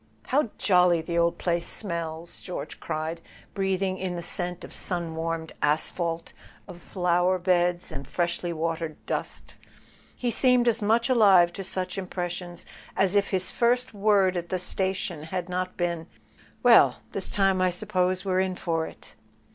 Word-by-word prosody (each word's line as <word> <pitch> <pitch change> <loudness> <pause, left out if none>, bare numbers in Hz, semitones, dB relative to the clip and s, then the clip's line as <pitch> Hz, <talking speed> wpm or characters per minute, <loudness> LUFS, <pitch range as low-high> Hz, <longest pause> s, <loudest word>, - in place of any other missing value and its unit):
"How 270 -2 +2
jolly 180 -4 +4
the 170 0 -1
old 170 0 +2
place 170 -1 -1
smells!" 170 -3 -4
George 180 - -6
cried, 160 +2 -4 0.3
breathing 190 -1 -1
in 185 -1 -2
the 170 - -4
scent 175 0 -2
of - - -10
sun 170 -3 -3
warmed 165 0 -3
asphalt, 165 +2 0 0.3
of 180 -3 -10
flower¬ 180 0 +1
beds 175 -1 +1
and 135 0 -6
freshly 175 0 -1
watered 165 -1 -3
dust. - - -4 0.6
He 245 -1 -1
seemed 250 0 +3
as 235 -1 +2
much 225 +3 +2
alive 195 -8 +5
to 195 - -5
such 185 0 -2
impressions 175 -1 -5 0.3
as 195 -1 +3
if 200 -1 +2
his 185 -1 -1
first 245 +1 +1
word 200 -2 +3
at 175 -1 -3
the - - -1
sta¬ 190 +1 -1
tion 175 -4 -4
had 175 +3 -4
not 185 0 -3
been: 170 -2 -2 0.6
"Well, - - +7 0.2
this - - -4
time 195 -2 +2
I 185 - +4
suppose 185 +1 0
we're 185 -1 +1
in 190 -1 0
for 165 -3 -1
it." - - -12
180 Hz, 160 wpm, -26 LUFS, 170-195 Hz, 0.6 s, Well